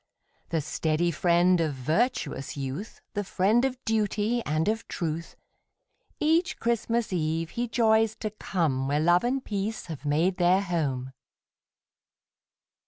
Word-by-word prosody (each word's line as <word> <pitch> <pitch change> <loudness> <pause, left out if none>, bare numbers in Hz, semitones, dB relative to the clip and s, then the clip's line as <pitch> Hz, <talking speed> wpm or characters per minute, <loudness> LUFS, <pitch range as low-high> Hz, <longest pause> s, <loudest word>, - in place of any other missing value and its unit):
The 165 -2 0
steady 155 +3 0
friend 175 +1 +3
of 155 -4 -1
virtuous 155 - -1
youth, 140 +10 -5
The 205 - -1
friend 205 +5 +2
of 265 -1 0
duty, 220 +1 +1
and 155 +3 0
of 220 +1 -1
truth, 165 -2 -4 0.8
Each 325 +3 +2
Christmas 235 -2 0
eve 165 -1 -1
he 240 +1 -2
joys 220 -1 +3
to 215 - -2
come 160 -10 -1
Where 145 +2 +1
love 175 +3 +4
and 255 +2 -1
peace 205 +1 -3
have 155 -5 -7
made 160 +6 +1
their 180 +1 +4
home. 140 -9 -2
180 Hz, 130 wpm, -27 LUFS, 155-220 Hz, 0.8 s, love